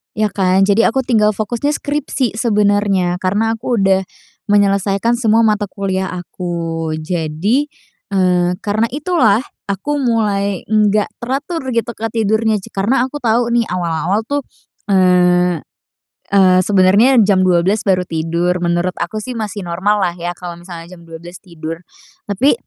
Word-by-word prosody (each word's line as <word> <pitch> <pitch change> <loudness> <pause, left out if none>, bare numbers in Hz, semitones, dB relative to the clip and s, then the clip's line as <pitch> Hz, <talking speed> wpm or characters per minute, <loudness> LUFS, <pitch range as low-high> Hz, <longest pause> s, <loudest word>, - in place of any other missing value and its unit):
Ya 215 -1 0
kan? 190 -1 +2
Jadi 205 +3 +3
aku 265 +3 +1
tinggal 215 -4 +2
fokusnya 240 +8 -2
skripsi 280 -6 -2
sebenernya 205 -5 +1
karena 205 +5 0
aku 245 +1 -2
udah 190 -1 +2 0.4
menyelesaikan 200 +3 +2
semua 225 -1 +3
mata 210 -2 +1
kuliah 190 -1 -3
aku. 170 -3 -4
Jadi, 175 - -1 0.5
eee, 180 -1 +2
karena 215 +2 0
itulah 260 - +2 0.2
aku 285 +10 -2
mulai 205 -6 0
nggak 210 -1 +1
teratur 275 +5 -4
gitu, 235 +1 0
Kak, 225 0 -4
tidurnya 220 -1 +1
j - - -12
karena 225 +7 +1
aku 265 +3 -4
tahu 235 -1 +1
nih 235 -1 +2
awal-awal 180 +3 -1
tuh, 285 +3 -3 0.4
eee 180 -2 +3 0.7
eee, 185 -2 +4
sebenernya 200 +7 +4
jam 195 -2 +3
12:00 185 +3 +2
baru 185 -3 +1
tidur. 170 +2 -1
Menurut 175 +1 0
aku 215 -1 -3
sih 255 - -5
masih 215 -3 -5
normallah 185 +1 0
ya 175 0 -5
kalau 175 -1 -8
misalnya 175 -1 -10
jam 170 -2 -14
12:00 170 +2 -10
tidur, 165 -2 -7 0.5
tapi, 225 +8 +2
200 Hz, 140 wpm, -16 LUFS, 180-225 Hz, 0.7 s, eee